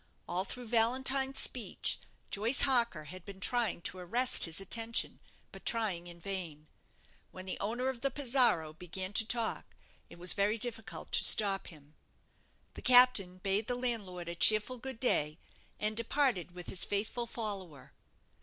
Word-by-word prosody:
All 185 +2 -2
through 250 +3 -5
Valentine's 265 +4 +1
speech, 245 -3 -1 0.3
Joyce 225 +6 +1
Harker 240 - +1
had 180 +4 -9
been 195 0 -11
trying 225 -4 +1
to 185 - -4
arrest 240 +8 +4
his 165 +1 0
attention, 225 +4 -1 0.3
but - - -12
trying 200 -7 -1
in 170 0 -10
vain. 170 -6 -6 0.6
When 185 0 -10
the 185 - -5
owner 235 +5 -2
of 260 -3 -3
the 275 - +1
'Pizarro' 245 - +2
began 180 +4 -6
to 220 - +2
talk, 230 -2 -3 0.3
it - - -13
was 180 +1 0
very 205 +2 +1
difficult 225 -1 -5
to - - +2
stop 195 -2 +4
him. 150 -3 -14 0.8
The - - -9
captain 245 -8 +6
bade 195 +3 -1
the 245 - -1
landlord 210 -8 -3
a 170 - -4
cheerful 215 +7 +5
good 265 -1 -7
day, 150 - 0 0.4
and 215 +1 -2
departed 230 - 0
with 180 -1 -8
his 190 - -1
faithful 220 +4 -2
follower. 195 - -5
215 Hz, 155 wpm, -32 LUFS, 180-245 Hz, 0.8 s, captain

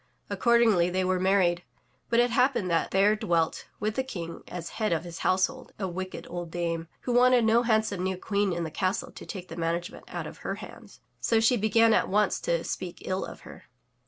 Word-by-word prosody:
Accordingly, 230 -7 +4
they 185 +1 0
were 185 0 +1
married. 185 -2 +3 0.5
But 235 - +3
it 240 0 +3
happened 245 -6 +2
that 165 - +1
there 200 +2 +4
dVelt 170 -5 0
with 215 +1 -1
the 265 - -1
King 170 -10 -6
as 175 -1 -6
head 215 -3 -2
of 165 -1 0
his 170 -1 -8
houselhold, 255 +8 0
a 195 - -2
wicked 185 +1 -6
old 175 -1 -5
dame, 165 -1 -2
who 250 - -3
wanted 245 -1 +5
no 225 +2 +4
handsome 220 -5 +1
new 185 0 -1
queen 200 0 0
in 170 -1 -2
the 160 - -4
castle 195 - -1
to - - -11
take 185 -4 -7
the 165 - -7
management 170 +1 -3
out - - -5
of - - -9
her - - -3
hands, - - -12 0.2
so 225 - +2
she 225 +3 +4
began 225 +1 +4
at - - +2
once 205 0 +2
to 170 -1 -1
speak 180 -2 -5
ill 185 0 -1
of - - -9
her. - - -13
190 Hz, 210 wpm, -28 LUFS, 175-225 Hz, 0.5 s, wanted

